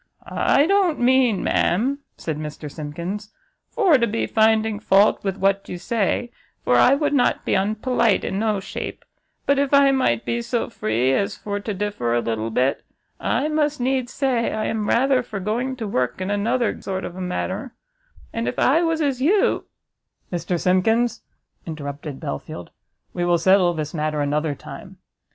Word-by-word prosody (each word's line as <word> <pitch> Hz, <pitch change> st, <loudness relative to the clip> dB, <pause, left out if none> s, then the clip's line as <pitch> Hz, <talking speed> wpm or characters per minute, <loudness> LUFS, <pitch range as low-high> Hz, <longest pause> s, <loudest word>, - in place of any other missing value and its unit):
"I 280 Hz, -, +2 dB
don't 380 Hz, -3 st, +2 dB
mean, 245 Hz, -4 st, +3 dB
ma'am," 255 Hz, +11 st, +1 dB, 0.2 s
said 155 Hz, -2 st, -4 dB
Mr 150 Hz, -1 st, -7 dB
Simkins, 170 Hz, +8 st, -6 dB, 0.4 s
"for 360 Hz, -, +3 dB
to 235 Hz, -, +2 dB
be 225 Hz, +1 st, -1 dB
finding 220 Hz, -1 st, +2 dB
fault 205 Hz, 0 st, +3 dB
with 195 Hz, -1 st, -2 dB
what 195 Hz, 0 st, +1 dB
you 180 Hz, -, -4 dB
say, 230 Hz, +4 st, -1 dB, 0.3 s
for 125 Hz, -, +2 dB
I 255 Hz, -, +6 dB
would 290 Hz, 0 st, 0 dB
not 265 Hz, -4 st, +2 dB
be -, -, 0 dB
unpelite 215 Hz, +2 st, +1 dB
in 195 Hz, -, -2 dB
no 215 Hz, -2 st, +1 dB
shape; 190 Hz, -, -6 dB, 0.4 s
but 280 Hz, 0 st, +3 dB
if 280 Hz, 0 st, +2 dB
I 280 Hz, -1 st, +6 dB
might 255 Hz, -, +1 dB
be 235 Hz, 0 st, -1 dB
so 235 Hz, 0 st, -2 dB
free 120 Hz, -, 0 dB
as 200 Hz, +8 st, 0 dB
for 205 Hz, -1 st, -4 dB
to 210 Hz, +2 st, -4 dB
differ 195 Hz, -, -2 dB
a -, -, +3 dB
little 115 Hz, -1 st, -2 dB
bit, 125 Hz, +4 st, 0 dB, 0.4 s
I 295 Hz, -, 0 dB
must 300 Hz, -1 st, 0 dB
needs 255 Hz, 0 st, 0 dB
say 255 Hz, -4 st, 0 dB
I 215 Hz, -, -2 dB
am 215 Hz, -2 st, -2 dB
rather 260 Hz, +1 st, +3 dB
for 215 Hz, -4 st, -6 dB
going 235 Hz, +7 st, -2 dB
to 230 Hz, -4 st, -5 dB
work 125 Hz, -8 st, -1 dB
in 185 Hz, +2 st, -2 dB
anotherguess 225 Hz, +3 st, 0 dB
sort 190 Hz, -1 st, -3 dB
of 175 Hz, -, -7 dB
a 185 Hz, -, -6 dB
manner; 185 Hz, +6 st, -4 dB, 0.6 s
and 230 Hz, 0 st, -2 dB
if -, -, -3 dB
I 310 Hz, +6 st, +4 dB
was 325 Hz, -1 st, 0 dB
as 270 Hz, -3 st, -1 dB
you 385 Hz, +9 st, +2 dB, 0.3 s
" -, -, -22 dB
"Mr 175 Hz, 0 st, -1 dB
Simkins," 225 Hz, +7 st, +2 dB, 0.5 s
interrupted 145 Hz, -2 st, -6 dB
Belfield, 70 Hz, -, -6 dB, 0.4 s
"we 175 Hz, -, -2 dB
will 175 Hz, 0 st, +3 dB
settle 180 Hz, 0 st, +4 dB
this 155 Hz, -1 st, -4 dB
matter 155 Hz, -1 st, -1 dB
another 145 Hz, +1 st, 0 dB
time." -, -, -11 dB
210 Hz, 175 wpm, -22 LUFS, 175-255 Hz, 0.6 s, I